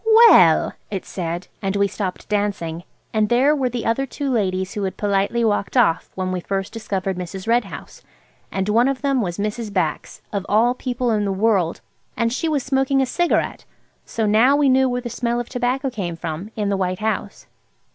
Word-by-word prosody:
"Well!" 165 - +5 0.2
it 195 -3 -4
said. 175 0 -4
And 195 0 -1
we 200 0 +3
stopped 190 -2 -5
dancing. 200 -5 -2 0.3
And 215 -1 +2
there 265 +5 +4
were 265 -3 0
the 245 -1 -4
other 270 +4 0
two 280 +1 -3
ladies 190 -5 -1
who 205 - -3
had 190 -1 -3
politely 205 +3 +1
walked 205 +3 0
off 195 -9 +3
when 185 -1 -2
we 185 - -1
first 195 +1 -3
discovered 195 -4 -3
Mrs. 185 +3 -6
Red 235 0 +3
House. - - -10 0.5
And 190 0 -2
one 230 +4 +3
of 275 0 -2
them 275 -3 +2
was 175 -5 -3
Mrs. 210 +1 -3
Bax–of 185 +2 -3
all 230 +4 +4
people 250 -1 -2
in 210 -2 +1
the 200 - 0
world! 195 -4 +1 0.4
And 230 0 +1
she 325 +5 -1
was 290 -4 0
smoking 270 +1 +1
a 265 - +3
cigarette. 345 +7 0 0.4
So 225 - -2
now 225 +7 +5
we 285 -1 +3
knew 260 0 +4
where 245 0 -2
the 240 - -5
smell 240 0 -1
of 240 - -5
tobacco 255 +2 -1
came 180 -7 -4
from, 165 +4 -5
in 210 -2 -1
the 200 - 0
White 185 -1 -1
House. 220 +2 -3
215 Hz, 195 wpm, -21 LUFS, 190-245 Hz, 0.5 s, Well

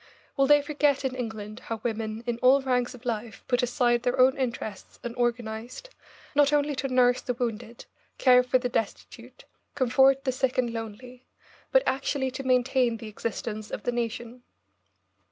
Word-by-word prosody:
Will 275 -1 +3
they 290 0 +6
forget 290 -2 +1
in 260 - -1
England 220 -3 -6
how 225 -1 -4
women 220 -1 -3
in 240 -1 -2
all 265 +2 +5
ranks 250 -1 0
of 250 +1 -16
life 225 -2 -4
put 245 -2 +2
aside 240 -1 +1
their 245 +1 -1
own 260 +1 +6
interests 235 -6 -5
and 240 0 -5
organised, 240 - -3 0.4
not 290 -1 +4
only 295 0 +2
to 270 - -1
nurse 250 -1 +4
the 250 - -3
wounded, 235 -1 -4 0.3
care 250 -1 +6
for 250 +1 +2
the 250 0 -2
destitute, 245 - -5 0.3
comfort 270 0 +4
the 260 - 0
sick 255 0 -1
and 240 -2 +1
lonely, 235 +3 -8 0.4
but - - +5
actually 265 0 -1
to 260 - -5
maintain 250 -2 +2
the 220 -1 -8
existence 215 0 -5
of - - -6
the 245 - 0
nation? 240 +1 -4
245 Hz, 170 wpm, -27 LUFS, 230-265 Hz, 0.4 s, they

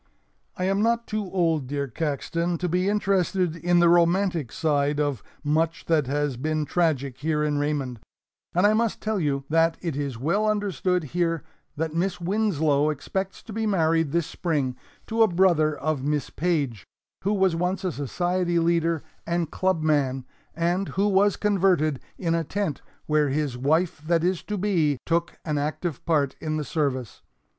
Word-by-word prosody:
I 185 - -2
am 195 +2 +1
not 235 +1 +2
too 215 -3 -3
old, 165 -7 +1
dear 140 +1 -2
Caxton, 165 +5 -2
to 180 - -2
be 180 +3 +1
interested 190 -4 +1
in 175 +1 +1
the 175 0 +5
romantic 170 - +3
side 145 -2 +1
of 145 -6 0 0.2
much 160 +2 0
that 155 -5 +2
has 145 +2 0
also 125 - -8
been 155 0 0
tragic 140 -5 0
here 150 +1 0
in 150 -1 0
Raymond, 140 -5 -2 0.6
and 180 +3 +4
I 210 - +5
must 225 0 +1
tell 215 -1 -1
you 140 -4 0
that 165 +1 +3
it 165 -5 -3
is 140 -4 -3
well 195 - +1
understood 190 -4 0
here 165 +2 -1 0.3
that 160 +1 -2
Miss 180 +2 -1
Winslow 165 -7 +1
expects 190 +6 -4
to 220 - -9
be 220 +1 -1
married 165 -5 +2
this 170 0 +1
spring 145 -8 -1 0.3
to 225 0 0
a 220 - +7
brother 170 -5 +3
of 155 -3 -1
Miss 145 -1 -1
Page 145 - -1 0.4
who 200 - +1
was 190 -3 +2
once 180 +3 -1
a 185 - 0
society 175 +5 -1
leader 165 -1 +1 0.2
and 170 -2 -1
club 185 -4 0
man, 135 -4 +1 0.3
and 175 +3 0
who 200 +2 +3
was 200 0 +3
converted 185 -8 +2 0.2
in 170 -3 0
a 165 0 +1
tent 190 -3 -2 0.2
where 150 -1 +2
his 140 -2 -1
wife 155 +6 +1
that 170 -1 +2
is 180 0 +1
to 210 - -3
be 170 -8 +1
took 170 +1 0
an 150 -2 0
active 150 +1 -3
part 145 -5 +2
in 155 -1 -2
the 150 - -3
service. 130 -5 -2
165 Hz, 175 wpm, -25 LUFS, 145-185 Hz, 0.6 s, a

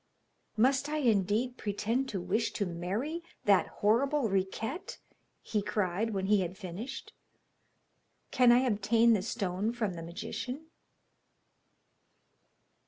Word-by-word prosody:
'Must 265 +5 +3
I 305 - -1
indeed 230 -1 +1
pretend 225 +6 -1
to 195 - -3
wish 215 +6 -1
to 205 - -1
marry 195 - -3 0.2
that 200 -3 +4
horrible 245 +4 +1
Riquette?' 195 - -2 0.5
he 210 - -1
cried, 205 0 -1
when 195 -3 -2
he 205 0 +4
had 180 +1 -4
finished. 210 +8 -7 1.2
'Can 250 -2 +6
I 245 +1 +6
obtain 230 0 +3
the 210 - +2
stone 200 -1 -2
from 225 -5 -2
the 165 - -7
magician?' 250 - -5
215 Hz, 115 wpm, -31 LUFS, 195-250 Hz, 1.2 s, Can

